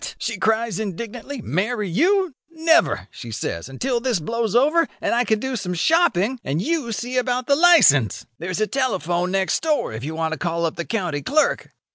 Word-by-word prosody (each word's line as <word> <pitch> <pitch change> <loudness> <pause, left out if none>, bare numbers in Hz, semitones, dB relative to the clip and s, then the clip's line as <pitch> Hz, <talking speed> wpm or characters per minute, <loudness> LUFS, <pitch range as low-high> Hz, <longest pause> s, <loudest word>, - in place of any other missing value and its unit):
she 230 - -3
cries 220 0 0
indignantly, 230 +5 -6
'marry 210 - -1
you! 350 - +2 0.2
Never,' 320 - +2
she 120 - -9
says, 100 -2 -4
'until 240 - -1
this 240 -5 0
blows 230 +5 -2
over, 305 +6 +4
and - - -1
I 240 +1 +3
can 220 -2 +1
do 265 +4 -3
some 180 -5 -3
shopping, 250 - +2
and 140 +4 -2
you 295 - -1
see 245 +4 -3
about 250 0 0
the 280 - +3
licence. 285 - +5
There's 185 +2 -3
a 215 - +2
telephone 180 - -1
next 190 0 0
door 305 - 0
if 110 +3 -6
you 155 +3 -4
want 160 0 -1
to 160 - -4
call 170 -1 -1
up 165 - -2
the 170 - -4
county 180 -10 -2
clerk. 305 - +1
225 Hz, 190 wpm, -22 LUFS, 175-265 Hz, 0.2 s, licence